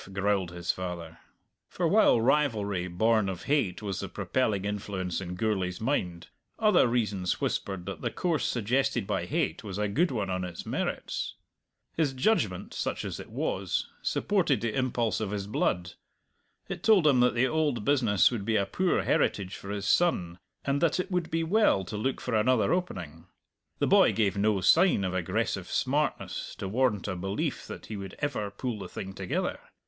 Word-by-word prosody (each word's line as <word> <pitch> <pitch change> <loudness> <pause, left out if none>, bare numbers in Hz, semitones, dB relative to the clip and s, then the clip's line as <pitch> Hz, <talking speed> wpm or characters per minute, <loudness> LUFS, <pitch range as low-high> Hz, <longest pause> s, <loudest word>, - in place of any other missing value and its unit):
growled 100 -2 +1
his 85 0 -2
father. 85 -3 -6 0.5
For - - 0
while - - +5
rivalry, 110 -8 +1
born 110 +3 +2
of 90 -2 -5
hate, 120 -10 0
was 100 -3 -3
the - - -4
propelling 105 -7 -1
influence 95 -3 -3
in 90 -1 -5
Gourlay's 95 -3 -1
mind, 90 -9 -1 0.3
other 210 - +4
reasons 105 -6 0
whispered 95 -3 -2
that 100 - -6
the - - -1
course 170 -5 -1
suggested 120 0 0
by - - -2
hate 80 - -1
was 100 -3 -5
a 105 0 0
good 160 - +2
one 105 -6 -2
on 90 0 -1
its 90 -2 -6
merits. - - -3 0.6
His 150 -4 +1
judgment, 175 +13 0
such - - -3
as - - -5
it - - -9
was, - - -2
supported 175 -9 +1
the 115 -1 -1
impulse 125 -4 0
of 110 -3 -2
his 100 -1 -3
blood. 90 -4 -1 0.7
It - - -5
told 210 -7 +5
him 140 -4 +5
that 125 0 +4
the 120 +2 +3
old 145 -6 0
business 120 -10 +4
would 115 -5 -3
be 110 +2 0
a 100 - +2
poor 180 - +1
heritage 95 -1 +1
for 100 - -9
his 100 0 -3
son, 90 - +2 0.3
and 140 +1 0
that 170 +1 +2
it 185 +2 -2
would 180 -2 -1
be 165 0 0
well 175 - +3
to 105 - -6
look 130 +6 -1
for 125 - -4
another 115 +5 +3
opening. 90 - -4 0.5
The - - +1
boy - - +5
gave 105 -3 +1
no 100 -1 +2
sign 175 - +5
of 95 -1 -1
aggressive 90 -3 -1
smartness - - -1
to 95 - -5
warrant 105 -2 +1
a 95 - -2
belief 95 +3 -3
that - - -8
he 110 - -6
would 95 -1 -7
ever 130 -8 -2
pull 115 +2 -4
the - - -7
thing 95 0 -6
together. 95 -2 -2
105 Hz, 180 wpm, -28 LUFS, 95-135 Hz, 0.7 s, while